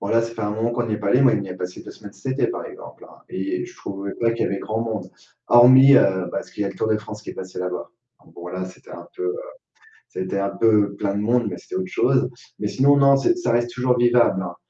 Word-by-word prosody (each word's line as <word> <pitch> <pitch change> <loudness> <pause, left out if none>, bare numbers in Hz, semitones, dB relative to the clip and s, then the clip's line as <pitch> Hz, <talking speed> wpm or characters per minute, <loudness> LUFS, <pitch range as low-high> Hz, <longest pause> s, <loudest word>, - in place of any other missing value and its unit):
Bon, 100 - -4
là, 115 0 +3
ça 115 0 -5
fait 115 - -5
un 105 - -1
moment 110 +3 -1
qu'on 120 0 -1
n'y 110 - -1
est - - -5
pas 105 - -3
allés. 125 +6 +4
Moi 130 -4 +5
on 100 - -3
y 95 - -7
a 90 - -6
passé 90 0 -7
2 - - -10
semaines 105 -2 -12
cet 130 +4 -5
été, 135 - +1
par 375 - -5
exemple, 460 +2 -12
hein. - - -17
Et 355 +3 -3
je 365 +1 -13
trouvais 100 0 -6
pas 115 -1 +1
qu'il 115 - -2
y - - +2
avait 100 - -2
grand 110 +1 -3
monde. 110 -5 -5 0.4
Hormis, 130 +3 +8
heu, 95 -2 +3
parce - - -5
qu'il 105 - -4
y 100 - -1
a - - -1
le - - -8
Tour 110 - -1
de 110 -1 +2
France 105 0 -9
qui - - -7
est - - -11
passé 95 -1 -8
là-bas. 90 0 -4 0.3
Donc - - -22
bon, 85 +1 -9
là, 90 +1 -4
c'était 95 - -15
un - - -10
peu, 385 - -4
heu, 400 +3 -2 0.7
c'était 95 +1 -4
un 100 0 0
peu 105 -1 +2
plein 100 -1 -2
de 100 - -1
monde 120 +2 +1
mais 90 - -6
c'était - - -11
autre 95 0 -3
chose. - - +1 0.3
Mais - - -2
sinon, 140 +2 +3
non, 140 0 +5
c'est 240 - +2
ça 360 - -1
reste 120 0 +1
toujours 125 0 +1
vivable, 120 -5 +3
hein. 90 -1 -6
110 Hz, 295 wpm, -22 LUFS, 100-125 Hz, 0.7 s, Hormis